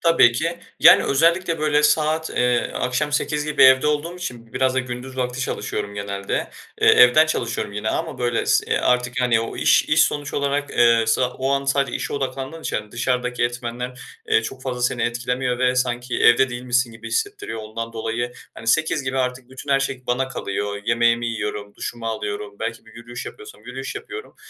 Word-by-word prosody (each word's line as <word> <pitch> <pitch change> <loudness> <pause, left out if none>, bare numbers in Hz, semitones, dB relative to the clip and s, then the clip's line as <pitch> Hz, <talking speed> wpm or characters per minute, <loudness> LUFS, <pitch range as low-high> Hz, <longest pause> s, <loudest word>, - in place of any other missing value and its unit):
Tabii 165 -8 +5
ki, 165 +7 -2 0.2
yani, - - +8
özellikle 165 +3 +2
böyle 150 -1 +2
saat, 155 +1 +2
eee, 125 -1 +1
akşam 145 +4 -1
20.00 150 0 0
gibi 150 - +2
evde 130 +2 +7
olduğum 150 +4 -1
için 125 -10 -7
b - - -24
biraz 130 0 +1
da - - +1
gündüz 130 +1 -6
vakti 125 0 -2
çalışıyorum 100 -4 -3
genelde. 100 -1 -3 0.3
Eee, - - +5
evden 125 +6 +7
çalışıyorum 115 -8 -2
yine 105 +2 -3
ama 160 -5 -3
böyle 120 -1 0
s - - +2
artık, 125 0 +1
yani, 120 -2 +3
o 115 - -5
iş - - +4
iş 155 +1 +4
sonuç 145 -1 -1
olarak, 140 0 -1
eee, 115 -1 +4
sa 125 +3 +2
o 135 +1 -2
an 140 0 +1
sadece 140 0 +1
işe - - -5
odaklandığın 135 +3 -4
için - - -2
yani 105 -1 -6
dışarıdaki 125 0 -1
etmenler, 120 +1 -4 0.3
eee, 115 - +3
çok 130 +3 -7
fazla 125 -2 -4
seni 120 -1 0
etkilemiyor 125 +1 -1
ve 125 0 +2
sanki 125 0 -1
evde 130 +2 +5
değilmişsin 120 0 -1
gibi 110 - -9
hissettiriyor 410 - -3
ondan 115 +2 -6
dolayı, 115 +2 -3 0.2
hani, 115 - -11
20.00 160 +4 +2
gibi 130 0 -2
artık 125 0 -3
bütün 130 +2 -8
her 135 0 +4
şey 130 -1 -3
bana 130 +2 0
kalıyor 100 -4 -4
yemeğimi 115 0 +2
yiyorum, 105 -2 -4
duşumu 120 -2 -6
alıyorum, 105 -2 -4
belki 115 +1 -4
bir - - -17
yürüyüş 120 +1 -8
yapıyorsam 430 -1 -11
yürüyüş - - -6
yapıyorum. 420 +2 -8
125 Hz, 190 wpm, -22 LUFS, 115-140 Hz, 0.3 s, yani